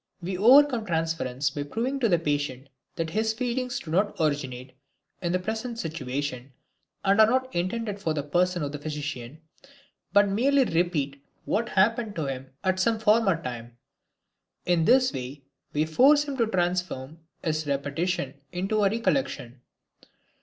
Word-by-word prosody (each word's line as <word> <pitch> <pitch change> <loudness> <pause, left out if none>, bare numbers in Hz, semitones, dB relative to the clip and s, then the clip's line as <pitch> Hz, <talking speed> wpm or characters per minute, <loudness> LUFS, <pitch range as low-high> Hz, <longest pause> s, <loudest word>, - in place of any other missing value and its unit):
We 185 +1 -4
overcome 250 +4 +6
transference 160 -5 -1
by 145 - -4
proving 235 - -2
to 235 -4 +2
the 175 - +4
patient 145 -4 -2 0.3
that 165 -1 -3
his 220 +3 0
feelings 245 +1 -2
do 155 - -9
not 195 +5 +1
originate 130 -5 -2 0.5
in 175 - -1
the 185 - +2
present 220 +5 -4
situation, 140 - -4 0.5
and 200 +2 +5
are 215 - +7
not 260 +2 0
intended 200 +4 -2
for 165 -5 -1
the 145 - -2
person 175 +3 +1
of 140 - -3
the 150 - -6
physician, 145 -2 -6 0.7
but 205 0 +5
merely 265 +8 +3
repeat 150 - -1 0.2
what 230 +2 0
happened 220 +2 +1
to 160 - -2
him 135 -1 -5
at 185 0 +1
some 225 +4 +2
former 215 -5 +3
time. 120 -1 -7 0.9
In 175 -2 +2
this 255 +3 +4
way 130 +2 -6 0.3
we 150 +1 +1
force 275 - +5
him 285 -2 -5
to 230 -3 +2
transform 175 -6 -2 0.2
his 155 -1 -1
repetition 140 +2 -1 0.2
into 195 +4 0
a 200 - +4
recollection. 220 - -1
175 Hz, 155 wpm, -26 LUFS, 145-220 Hz, 0.9 s, are